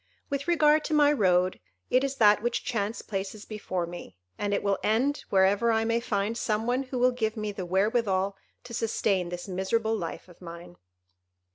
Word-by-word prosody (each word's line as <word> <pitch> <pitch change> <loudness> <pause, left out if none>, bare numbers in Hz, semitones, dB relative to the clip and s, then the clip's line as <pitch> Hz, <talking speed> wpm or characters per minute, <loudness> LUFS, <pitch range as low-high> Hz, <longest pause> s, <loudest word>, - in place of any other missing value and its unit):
With 280 +2 -2
regard 310 -3 +4
to 310 - 0
my 295 -1 +5
road, 185 -6 +2 0.3
it 255 +1 +4
is 275 0 -1
that 210 -4 +5
which 240 +1 -1
chance 225 -2 -2
places 200 +1 -5
before 185 -5 -3
me, 170 - -9 0.2
and 205 0 -2
it 200 - 0
will 200 -1 +1
end 255 +7 +1
wherever 200 +4 +3
I 225 0 +1
may 230 +1 +1
find 215 -2 -1
some 220 -1 -1
one 250 +2 +1
who 260 -1 -5
will 250 +1 +4
give 225 -3 -2
me 215 -1 -2
the 190 -3 -6
wherewithal 195 0 +1 0.3
to 235 - -10
sustain 200 -5 0
this 175 +1 -6
miserable 220 +4 0
life 175 -4 -5
of 175 0 -18
mine." 170 - -10
215 Hz, 185 wpm, -27 LUFS, 190-240 Hz, 0.3 s, my